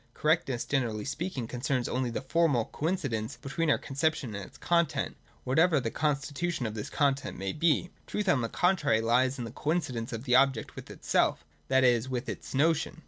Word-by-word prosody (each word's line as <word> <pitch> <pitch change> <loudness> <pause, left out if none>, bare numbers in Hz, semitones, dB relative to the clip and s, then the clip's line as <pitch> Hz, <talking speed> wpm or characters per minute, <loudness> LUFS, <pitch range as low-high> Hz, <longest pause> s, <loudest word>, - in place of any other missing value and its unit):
Correctness, 150 -6 +1
generally 115 -7 -1
speaking, 145 -3 -3
concerns 125 +1 -1
only 125 0 -1
the 120 - -4
formal 140 -5 +2
coincidence 140 - -2
between 160 +4 -2
our - - +4
conception 140 -4 -1
and 100 0 -5
its - - -17
content, 170 -3 +1 0.3
whatever 160 +4 +3
the 115 -3 -3
con 150 -2 +1
stitution 145 +1 -3
of 110 - -3
this 105 -1 -5
content 140 -2 0
may 95 0 -3
be. 165 +2 +1 0.2
Truth, 210 -1 -2
on 140 -7 +3
the 115 - -2
contrary, 170 -11 +2
lies 125 +4 +2
in 120 - -4
the 115 - -7
coincidence 135 -5 -2
of 115 0 -5
the 125 -2 +2
object 135 -3 +2
with - - -9
itself, - - 0 0.2
that 130 0 +3
is, 120 0 +3
with 130 0 -3
its - - -6
notion. 160 +3 +1
135 Hz, 190 wpm, -29 LUFS, 120-155 Hz, 0.3 s, our